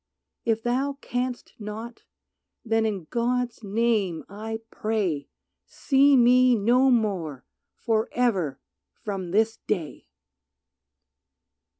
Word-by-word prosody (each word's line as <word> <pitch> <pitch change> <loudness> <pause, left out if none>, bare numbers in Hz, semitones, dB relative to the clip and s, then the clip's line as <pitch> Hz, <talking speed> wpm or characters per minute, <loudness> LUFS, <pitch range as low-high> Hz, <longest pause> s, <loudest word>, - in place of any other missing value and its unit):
If 225 -1 +1
thou 265 +4 0
canst 245 0 -3
not 220 +3 -7 0.6
then 225 0 +2
in 200 -5 -3
God's 245 0 -1
name 205 -4 0
I 220 +2 -6
pray 200 -10 -2 0.4
See 275 0 +4
me 250 +1 +5
no 245 +5 +4
more 190 - 0 0.3
forever 220 - 0 0.4
from 195 -4 -4
this 220 +4 +2
day. 170 - -3
225 Hz, 90 wpm, -25 LUFS, 200-245 Hz, 0.6 s, me